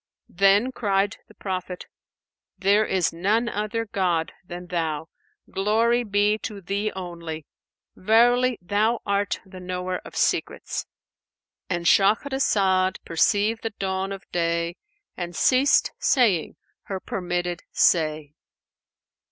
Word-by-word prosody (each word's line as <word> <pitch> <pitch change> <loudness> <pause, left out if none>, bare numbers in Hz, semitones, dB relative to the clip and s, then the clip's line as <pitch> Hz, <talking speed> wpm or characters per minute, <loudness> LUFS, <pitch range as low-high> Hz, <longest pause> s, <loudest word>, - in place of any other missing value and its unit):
Then 200 +6 +4
cried 200 -3 0
the 215 - -19
Prophet, 185 -2 -5 0.7
"There 200 +3 +3
is 185 -3 +1
none 210 +8 +1
other 225 +1 -2
god 180 -6 0
than 180 0 -8
Thou! 160 -3 -2 0.4
Glory 225 +5 +2
be 205 0 +1
to 210 -2 -6
Thee 200 +3 -2
only! 170 -4 -6 0.5
Verily, 240 +4 +3
Thou 215 +5 +1
art 200 0 0
the 190 -1 -11
Knower 180 0 -3
of - - -12
Secrets."[FN#495]—And 175 -2 -4
Shahrazad 195 -3 +3
perceived 205 +6 +2
the 225 - -2
dawn 190 0 -2
of 195 -1 -6
day 170 0 0 0.4
and 175 -1 -5
ceased 265 - +4
saying 215 - +2 0.3
her 190 -1 -4
permitted 175 -2 -3
say. 155 -3 +2
195 Hz, 110 wpm, -24 LUFS, 175-215 Hz, 0.7 s, Then